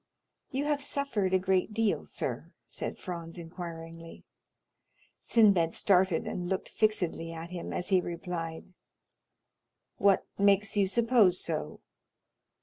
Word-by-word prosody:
"You 275 Hz, +1 st, -2 dB
have 295 Hz, -1 st, 0 dB
suffered 280 Hz, -9 st, -1 dB
a 190 Hz, -, +5 dB
great 190 Hz, +2 st, 0 dB
deal, 225 Hz, -2 st, 0 dB
sir?" -, -, -4 dB
said -, -, -5 dB
Franz 170 Hz, -3 st, -6 dB
inquiringly. 165 Hz, -1 st, -8 dB, 1.0 s
Sinbad 195 Hz, -8 st, +4 dB
started 185 Hz, -3 st, +3 dB
and 175 Hz, -1 st, -4 dB
looked 190 Hz, -1 st, -2 dB
fixedly 180 Hz, -6 st, 0 dB
at 165 Hz, +1 st, -8 dB
him, 175 Hz, -2 st, -5 dB
as 180 Hz, -, -3 dB
he 190 Hz, -2 st, +4 dB
replied, 170 Hz, 0 st, -5 dB, 1.2 s
"What 200 Hz, -1 st, +3 dB
makes 200 Hz, +1 st, +3 dB
you 200 Hz, -2 st, +3 dB
suppose 225 Hz, -4 st, +4 dB
so?" 155 Hz, -2 st, -3 dB
185 Hz, 120 wpm, -30 LUFS, 170-210 Hz, 1.2 s, a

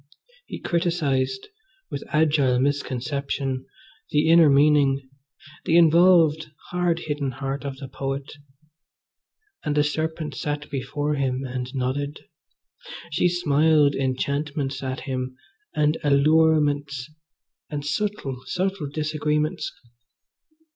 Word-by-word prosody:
He -, -, -6 dB
criticised, 170 Hz, -, -1 dB, 0.4 s
with 140 Hz, -, -4 dB
agile 145 Hz, -5 st, +2 dB
misconception, 135 Hz, -1 st, -2 dB, 0.4 s
the 150 Hz, +1 st, +2 dB
inner 165 Hz, -2 st, +7 dB
meaning, 140 Hz, -1 st, +4 dB, 0.6 s
the 165 Hz, -, +4 dB
involved, 165 Hz, -2 st, +5 dB, 0.2 s
hard 175 Hz, -1 st, 0 dB
hidden 145 Hz, -2 st, -2 dB
heart 135 Hz, +2 st, -4 dB
of 140 Hz, -1 st, -5 dB
the 135 Hz, -1 st, -8 dB
poet; 135 Hz, +1 st, -4 dB, 1.3 s
and 150 Hz, -1 st, -1 dB
the 150 Hz, -, +4 dB
serpent 155 Hz, 0 st, -2 dB
sat 150 Hz, +2 st, -4 dB
before 145 Hz, +2 st, -2 dB
him 135 Hz, -2 st, -1 dB
and 125 Hz, 0 st, -4 dB
nodded. 135 Hz, +3 st, -2 dB, 0.9 s
She 175 Hz, +4 st, +2 dB
smiled 155 Hz, -3 st, +3 dB
enchantments 140 Hz, +1 st, -2 dB
at 130 Hz, -1 st, -4 dB
him, 130 Hz, -1 st, -4 dB, 0.4 s
and 150 Hz, +1 st, +2 dB
allurements, 145 Hz, -2 st, +2 dB, 0.6 s
and 145 Hz, -2 st, -4 dB
subtle, 150 Hz, -4 st, -2 dB
subtle 185 Hz, -4 st, -2 dB
disagreements. 150 Hz, 0 st, -1 dB
145 Hz, 100 wpm, -24 LUFS, 135-155 Hz, 1.3 s, inner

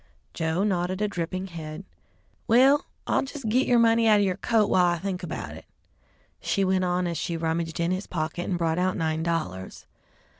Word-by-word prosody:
Joe 160 Hz, +3 st, 0 dB
nodded 185 Hz, -2 st, 0 dB
a 210 Hz, -, +1 dB
dripping 185 Hz, -1 st, -3 dB
head. 165 Hz, -1 st, -8 dB, 0.6 s
"Well, 265 Hz, +5 st, +5 dB, 0.2 s
I'll -, -, +2 dB
jes' 275 Hz, 0 st, -7 dB
git 235 Hz, +4 st, +1 dB
yer 245 Hz, -, +4 dB
money 230 Hz, 0 st, +4 dB
out 215 Hz, -1 st, +6 dB
of 205 Hz, -, +3 dB
yer 185 Hz, -2 st, 0 dB
coat 220 Hz, 0 st, +2 dB
while 180 Hz, -1 st, +4 dB
I 175 Hz, 0 st, +1 dB
think 185 Hz, +1 st, -4 dB
about 175 Hz, -, -5 dB
it," -, -, -12 dB, 0.7 s
she 195 Hz, -, 0 dB
went 185 Hz, 0 st, +1 dB
on 180 Hz, 0 st, 0 dB
as 170 Hz, -3 st, -2 dB
she 170 Hz, -, -2 dB
rummaged 165 Hz, 0 st, -2 dB
in 170 Hz, +1 st, +1 dB
his 185 Hz, +2 st, -3 dB
pocket 165 Hz, +1 st, -3 dB
and 180 Hz, -, 0 dB
brought 165 Hz, 0 st, 0 dB
out 185 Hz, +1 st, 0 dB
nine 160 Hz, -2 st, -1 dB
dollars. 160 Hz, -, -3 dB
180 Hz, 195 wpm, -26 LUFS, 165-205 Hz, 0.7 s, out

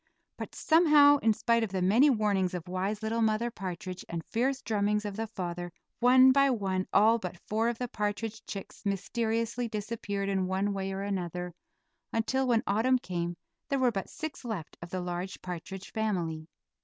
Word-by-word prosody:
But -, -, -7 dB
somehow, 300 Hz, -3 st, +6 dB
in 225 Hz, -5 st, +3 dB
spite 230 Hz, +2 st, +2 dB
of 225 Hz, -, -1 dB
the 190 Hz, -1 st, -1 dB
many 230 Hz, +11 st, +5 dB
warnings 205 Hz, -6 st, +1 dB
of 175 Hz, -1 st, -6 dB
wise 195 Hz, +4 st, -2 dB
little 225 Hz, +1 st, 0 dB
Mother 220 Hz, +2 st, +1 dB
Partridge, 185 Hz, -2 st, -6 dB
and 170 Hz, -1 st, -4 dB
fierce 260 Hz, +4 st, 0 dB
drummings 210 Hz, -1 st, 0 dB
of 205 Hz, -1 st, -4 dB
the 225 Hz, +1 st, -3 dB
father, 175 Hz, -4 st, -5 dB, 0.3 s
one 255 Hz, +2 st, +7 dB
by 275 Hz, +1 st, +4 dB
one 190 Hz, -6 st, -1 dB
all 225 Hz, +3 st, +5 dB
but 180 Hz, -4 st, -6 dB
four 220 Hz, +5 st, 0 dB
of 235 Hz, -, -3 dB
the 250 Hz, -, -3 dB
partridge 210 Hz, +1 st, -3 dB
chicks 195 Hz, -, -8 dB
mysteriously 225 Hz, +4 st, -1 dB
disappeared 210 Hz, -2 st, -3 dB
in 190 Hz, -2 st, 0 dB
one 195 Hz, +2 st, 0 dB
way 195 Hz, 0 st, -3 dB
or 195 Hz, +1 st, -3 dB
another, 180 Hz, -3 st, -3 dB, 0.6 s
until 260 Hz, +4 st, 0 dB
when 235 Hz, -2 st, +3 dB
autumn 225 Hz, +6 st, +3 dB
came 175 Hz, -5 st, -4 dB, 0.3 s
there 275 Hz, -, +1 dB
were 255 Hz, -2 st, +3 dB
but 195 Hz, -3 st, -4 dB
six 315 Hz, -3 st, -6 dB
left 215 Hz, -10 st, -5 dB
of 170 Hz, -, -8 dB
the 185 Hz, 0 st, -3 dB
large 180 Hz, +2 st, -4 dB
partridge 185 Hz, +2 st, -7 dB
family. 170 Hz, -8 st, -2 dB
210 Hz, 180 wpm, -30 LUFS, 185-230 Hz, 0.6 s, one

